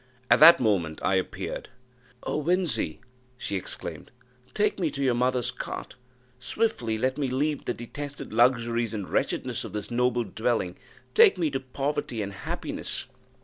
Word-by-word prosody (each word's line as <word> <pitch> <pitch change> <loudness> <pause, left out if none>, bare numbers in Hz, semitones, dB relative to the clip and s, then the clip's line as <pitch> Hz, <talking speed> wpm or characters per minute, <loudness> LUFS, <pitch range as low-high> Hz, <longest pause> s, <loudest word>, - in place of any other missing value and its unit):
At - - +7
that 165 +2 +10
moment 90 -9 +1
I - - +2
appeared. 95 -1 -2 0.5
"Oh, 150 - -1
Winzy!" 180 +2 0 0.4
she 100 - -3
exclaimed, 95 - -5 0.5
"take 210 -1 +1
me 170 -4 +1
to 140 -1 -3
your 130 -2 +3
mother's 125 0 +1
cot; - - -6 0.5
swiftly 120 - -1
let 130 +4 0
me 140 - +1
leave 140 +3 -1
the - - 0
detested 140 +2 -7
luxuries 115 -1 +2
and 100 -3 -4
wretchedness - - -1
of - - -8
this 105 +1 -5
noble 120 0 +2
dwelling 110 -3 -1 0.4
take 440 -2 +7
me 165 -4 0
to 135 - -1
poverty 135 -2 -2
and 100 0 -5
happiness." - - -4
125 Hz, 150 wpm, -27 LUFS, 110-145 Hz, 0.5 s, that